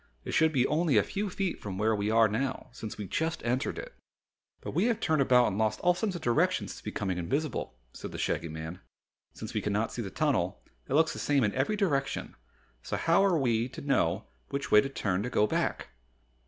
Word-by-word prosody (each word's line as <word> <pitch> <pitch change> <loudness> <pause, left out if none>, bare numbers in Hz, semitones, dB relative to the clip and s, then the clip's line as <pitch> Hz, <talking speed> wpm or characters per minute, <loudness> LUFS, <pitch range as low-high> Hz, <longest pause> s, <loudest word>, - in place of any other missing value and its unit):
It - - -4
should 160 0 +4
be 130 -4 +2
only 150 -4 +2
a 105 - +5
few 205 +1 -3
feet 190 0 -2
from 95 -3 -5
where 110 +2 +2
we 105 0 -1
are 115 0 +5
now 130 +6 -2
since 110 - -7
we 105 - -4
just 160 - -2
entered 125 +4 0
it." - - -7 0.7
"But - - -5
we - - +1
have 235 -2 +1
turned 160 -8 +2
about 125 -2 +5
and 100 +1 -3
lost 110 -1 +1
all 180 - +4
sense 185 +1 -2
of 175 - -5
direction 120 -5 +2
since - - -8
becoming 95 -2 -3
invisible," 140 - -2 0.2
said - - -7
the - - -6
Shaggy 85 - -1
Man. 80 +3 -6 0.5
"Since - - -7
we - - 0
cannot 105 +2 0
see 120 - -3
the 100 - -4
tunnel, 130 - 0 0.3
it 135 - +1
looks 160 +1 +4
the - - -7
same 140 -3 +2
in 105 - +1
every 130 +11 0
direction, 145 -10 -1 0.5
so - - -3
how 170 +4 +3
are 190 -4 +3
we 120 -3 +1
to - - -9
know 140 -1 +1 0.2
which 140 0 -3
way 105 - +8
to 135 - -3
turn 100 -8 -1
to 120 - -3
go 105 - +3
back?" - - -1
130 Hz, 220 wpm, -29 LUFS, 105-160 Hz, 0.7 s, way